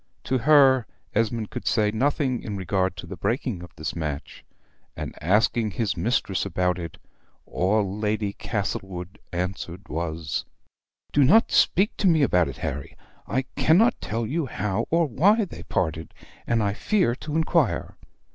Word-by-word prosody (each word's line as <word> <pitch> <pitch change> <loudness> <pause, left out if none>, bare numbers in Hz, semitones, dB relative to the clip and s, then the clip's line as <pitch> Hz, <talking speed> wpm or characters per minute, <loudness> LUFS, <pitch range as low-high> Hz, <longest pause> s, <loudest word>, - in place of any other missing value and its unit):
To 130 0 0
her 135 -2 +5 0.3
Esmond 115 0 0
could - - -6
say 105 -2 +2
nothing 130 +2 0
in 105 -2 -5
regard 95 0 0
to - - -7
the 95 - -7
breaking 110 -1 -2
of 90 - -9
this 75 - -4
match; 75 -4 -5 0.5
and, - - -5
asking 105 +5 +2
his 100 -4 -1
mistress 95 0 0
about 90 -1 0
it, 85 -2 -7 0.5
all 100 +1 0
Lady 105 -1 -1
Castlewood 95 -4 -4
answered 90 +1 -4
was: 80 -2 -3 0.7
"do 145 - +5
not 210 - +5
speak 200 +3 +3
to 200 - +2
me 160 -4 +4
about 90 -10 +3
it, 70 - -7
Harry. 70 +1 -5 0.3
I 130 +2 0
cannot 195 +10 +4
tell 115 +1 -2
you 150 +5 -1
how 105 0 -2
or 165 +1 +3
why 200 - +3
they - - -10
parted, 80 -1 -2 0.3
and 115 -2 +2
I 100 -1 +1
fear 180 - +1
to 150 +1 -5
inquire. 160 - +1
105 Hz, 155 wpm, -25 LUFS, 90-135 Hz, 0.7 s, her